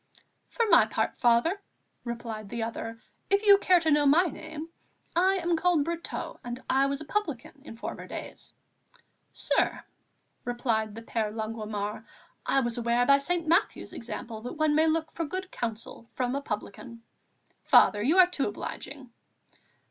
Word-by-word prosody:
"For 465 - 0
my - - +6
part, - - -2
Father," 245 +12 +3 0.4
replied 230 -3 -6
the 235 +1 -3
other, 225 0 -5 0.3
"if 400 +2 +2
you 400 -1 +8
care 365 -3 +5
to 320 -1 +1
know 295 -1 +4
my 310 +6 +6
name, 315 -2 -6 0.5
I 375 +3 +4
am 345 -2 0
called 330 -3 +2
Brotteaux, 335 0 -5
and 245 0 -5
I 270 +1 +3
was 275 +1 -3
a - - -7
publican 295 - -3
in 230 -6 -10
former - - -6
days." - - -8 0.8
"Sir," - - 0 0.6
returned 230 -3 -1
the 230 - -8
Père 225 -2 -2
Longuemare, 215 -1 -4 0.4
"I 270 - +3
was 240 -1 -2
aware 235 +1 +2
by 275 +2 +6
St. 335 +3 -1
Matthew's 335 +2 +1
example 230 -1 -6
that 245 - -6
one 310 -1 +2
may 315 +2 +4
look 320 0 0
for 335 - -3
good 370 +4 -5
counsel 230 0 -6
from 250 -1 -1
a 280 - -1
publican." 230 0 -6 0.6
"Father, 205 - +5
you 295 - +2
are 370 - +9
too 300 -9 -1
obliging." 260 +5 -7
270 Hz, 160 wpm, -28 LUFS, 230-325 Hz, 0.8 s, are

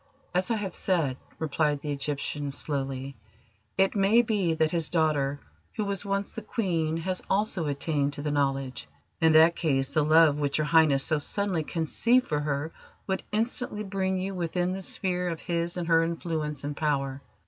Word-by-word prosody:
"As 180 +1 +1
I 230 - +2
have 200 -4 -3
said," 165 -9 0 0.2
replied 150 -2 0
the 150 - -3
Egyptian 145 0 -3
slowly, 135 -1 -4 0.6
"it 195 0 +3
may 210 +4 +4
be 200 -7 +1
that 160 -1 +2
his 165 -3 0
daughter, 145 -4 +1 0.4
who 215 - -1
was 200 -1 -1
once 200 0 -2
the 225 - -5
Queen, 170 -7 -1
has 185 +2 -1
also 195 -5 +1
attained 145 0 -1
to 145 - -5
the 150 - -1
Knowledge. 135 -3 -1 0.3
In 160 -2 +4
that 160 +2 +7
case 135 -6 0
the 155 - +3
love 155 -1 +5
which 145 -1 0
Your 155 - +1
Highness 150 -3 +4
so 155 -2 +1
suddenly 195 +2 -1
conceived 230 +11 +1
for 150 - 0
her 145 +1 -2 0.3
would 190 -1 -1
instantly 220 0 -1
bring 190 -1 -1
you 190 +1 -3
within 175 0 -1
the 190 - -4
sphere 180 -1 -1
of 165 -2 -4
his 170 0 -2
and 175 -2 -3
her 165 -1 +5
influence 160 -3 -3
and 145 0 -3
power. 140 -3 -1
160 Hz, 180 wpm, -27 LUFS, 145-190 Hz, 0.6 s, that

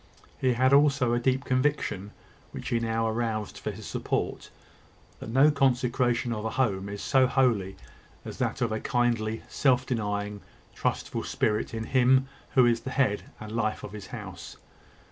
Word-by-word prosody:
He 130 -1 +2
had 130 +3 +3
also 140 -4 +4
a 120 - +2
deep 130 +2 0
conviction, 130 -7 0 0.4
which - - -6
he 115 - +1
now 115 0 0
aroused 110 -2 -2
for - - -4
his - - -8
support - - -3 0.7
that - - -7
no 135 +6 +5
consecration 125 -3 +1
of 105 -1 -4
a 110 - -1
home 100 -5 0
is 100 0 -6
so 130 -2 +4
holy 115 -8 +1 0.5
as - - -8
that - - -1
of 115 -2 +1
a 110 - -1
kindly, 115 -3 0
self 130 -2 +2
denying, 105 -4 -2 0.3
trustful - - -2
spirit 105 0 0
in 110 -1 -4
him 130 +2 +3 0.3
who 130 -2 +7
is 120 -1 +3
the 130 - -6
head 130 -7 +1 0.2
and 110 0 -8
life 110 -1 -1
of - - -7
his 105 -2 -8
house. 95 -7 -8
120 Hz, 165 wpm, -27 LUFS, 110-130 Hz, 0.7 s, who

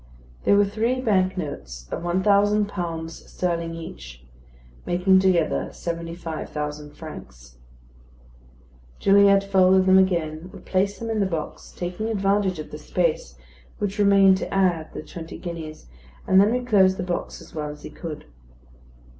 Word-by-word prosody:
They - - +5
were 205 0 +5
three 225 +5 -1
bank 190 -6 +1
notes 60 - -6
of - - -3
one 175 +2 0
thousand 205 +1 +4
pounds 165 -4 -5
sterling 170 -2 -2
each; 65 - -10 0.6
making 190 +2 +3
together 180 -4 +1
seventy 170 0 -5
five 165 -3 -6
thousand 150 0 -5
francs. 60 0 -11 1.4
Gilliatt 200 0 +5
folded 190 -1 +4
them 190 0 +6
again, 170 -3 0
replaced 195 +2 -1
them 230 -1 -4
in 220 - -1
the 200 - +2
box, 165 -4 -5
taking 180 +5 -4
advantage 195 -3 +1
of 155 - -8
the - - -7
space - - -1 0.4
which 205 0 -3
remained 195 -2 +6
to - - -5
add 175 -5 +1
the - - -7
twenty 165 0 -9
guineas; 165 -3 -7 0.4
and 190 0 +5
then 205 +2 +3
reclosed 210 -7 +3
the - - -3
box 180 -1 -4
as - - -15
well 150 -1 -4
as 150 0 -10
he - - -8
could. 160 -4 -7
185 Hz, 150 wpm, -24 LUFS, 160-200 Hz, 1.4 s, them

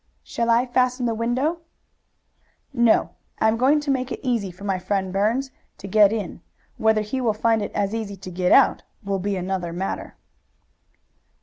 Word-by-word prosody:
"Shall 235 0 -2
I 235 +2 +4
fasten 250 0 +1
the 230 - 0
window?" 255 +9 -1 1.1
"No. 235 -2 +3 0.3
I - - +2
am 220 - +3
going 265 +6 +3
to 290 -1 -1
make 260 -1 -1
it - - -4
easy 235 -7 0
for 185 +3 -13
my 195 -2 -1
friend, 190 0 -2
Burns, 230 +7 0 0.3
to - - -11
get 205 0 +5
in. 210 -6 -4 0.4
Whether 220 -1 +3
he 220 +5 -3
will 230 -3 +1
find 225 0 +2
it 205 - -4
as 200 0 -1
easy 220 -3 -4
to 185 -1 -9
get 180 0 0
out - - +5 0.2
will 195 -1 -2
be 200 +2 -2
another 180 -1 -3
matter." 185 +3 -4
220 Hz, 180 wpm, -23 LUFS, 195-245 Hz, 1.1 s, get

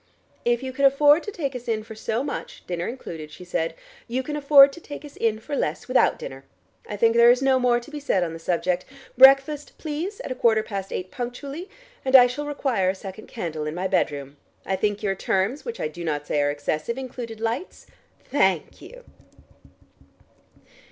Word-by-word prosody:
"If 240 +1 +1
you 260 0 -5
can 280 - -2
afford 290 +3 +6
to 415 - -6
take 280 -8 -4
us 245 -1 -7
in 220 -2 -1
for 220 - -10
so 220 +3 -2
much, 285 - -6
dinner 175 -1 -3
included," 165 -11 -7
she 180 - -12
said, 165 -2 -2 0.3
"you 255 +2 -2
can 295 +2 -4
afford 280 -1 +7
to 340 - -11
take 295 0 -9
us 290 - -12
in 225 -2 0
for 285 +7 -5
less - - -2
without 255 0 +3
dinner. 135 0 -8 0.5
I 205 - -4
think 230 +2 +3
there 235 0 +7
is 250 +2 +4
no 265 -1 +4
more 245 -1 +3
to 240 +5 -13
be 300 - -5
said 195 -10 +1
on 165 -2 -3
the 165 - -8
subject. 175 +1 0 0.3
Breakfast, 275 +3 +5
please, 325 +7 -4
at - - -6
a - - +1
quarter 225 -3 +3
past 195 -3 -5
eight 185 0 -4
punctually 275 - -6 0.3
and 265 0 +2
I 250 -2 +10
shall 275 +4 -3
require 260 -10 0
a 190 - -1
second 195 +2 -9
candle 160 -8 -4
in 150 - -4
my 185 +2 -1
bedroom. 145 -6 -1 0.3
I 190 - 0
think 205 +2 -1
your 195 -2 +1
terms, 195 +7 -1
which 470 - -5
I - - -1
do 170 +3 -8
not 150 -3 -2
say 145 - 0
are 145 - +2
excessive, 155 - -2
included 245 -4 -7
lights? 230 - -4 0.5
Thank 190 - +1
you!" - - -12
235 Hz, 205 wpm, -24 LUFS, 185-275 Hz, 0.5 s, I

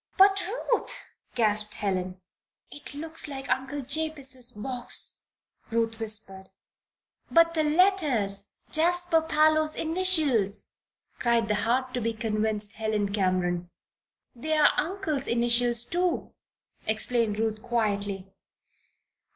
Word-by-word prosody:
"But, 390 0 +6
Ruth!" 475 +3 -1 0.4
gasped 210 -2 +1
Helen. 185 -2 -3 0.5
"It 290 -1 -11
looks 320 +2 -3
like 270 -2 -6
Uncle 265 +2 -1
Jabez's 275 -3 -1
box," 245 +4 -2 0.5
Ruth 225 -1 -1
whispered. 210 -3 -4 0.8
"But 335 0 +4
the 315 -1 +1
letters! 300 - +2 0.3
Jasper 345 +1 +2
Parloe's 310 0 +2
initials," 315 - +2 0.5
cried 235 -2 +1
the - - +3
hard 245 +5 0
to 245 - -2
be 230 +1 -1
convinced 215 -1 -1
Helen 215 -2 -1
Cameron. 180 -3 0 0.6
"They're 305 +4 +3
uncle's 320 -6 -1
initials, 240 0 +2
too," 350 +6 -2 0.5
explained 220 0 +1
Ruth, 220 -1 -1
quietly. 205 -5 -2
240 Hz, 100 wpm, -27 LUFS, 215-310 Hz, 0.8 s, But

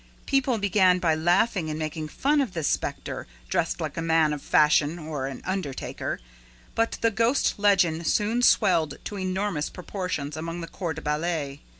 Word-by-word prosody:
People 270 -3 +2
began 190 -3 +4
by 170 -3 +2
laughing 175 +2 +2
and 155 - -3
making 155 0 -4
fun 285 - +1
of 245 -9 -2
this 165 -3 -1
specter - - -3 0.2
dressed - - 0
like - - -4
a - - -1
man 160 -2 +3
of 145 - -5
fashion 150 +1 +3
or 150 -5 -4
an 135 -2 -7
undertaker; 185 -8 -3 0.5
but 230 0 0
the 230 - +3
ghost 230 +2 +1
legend 180 -5 +3
soon 225 +3 +1
swelled 165 - +3
to 205 - -5
enormous 185 -4 -1
proportions 180 -6 -4
among 165 +2 -5
the 165 - -5
corps 165 -1 -4
de 160 - -8
ballet. 150 -2 -2
170 Hz, 170 wpm, -26 LUFS, 155-200 Hz, 0.5 s, began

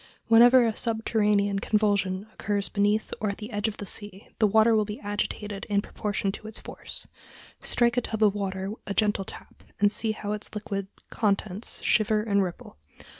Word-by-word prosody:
Whenever 240 +2 +7
a 225 -2 0
subterranean 210 -3 +1
convulsion 200 -2 +1
occurs 205 -1 -1
beneath 205 +1 +1
or 215 - 0
at 200 - -4
the 215 +2 -8
edge 205 0 -1
of 215 - -4
the 205 - -6
sea, 205 0 -5
the 215 - +5
water 220 +2 +5
will 215 - +3
be 210 +1 -6
agitated 205 0 -3
in 200 -1 +2
proportion 205 -1 -2
to 215 +2 -9
its 220 - -3
force. - - -5 0.5
Strike 240 0 +3
a - - +4
tub 220 -2 -2
of 205 -2 +5
water 195 -1 -3 0.2
a 200 - -3
gentle 210 -3 +1
tap - - -11 0.2
and 205 0 +4
see 220 0 +2
how 210 -1 -5
its 210 +1 -5
liquid 200 -2 -4 0.2
contents 205 -1 -1
shiver 215 -1 +2
and 200 -2 +2
ripple. 180 - -5
210 Hz, 180 wpm, -27 LUFS, 200-220 Hz, 0.5 s, Whenever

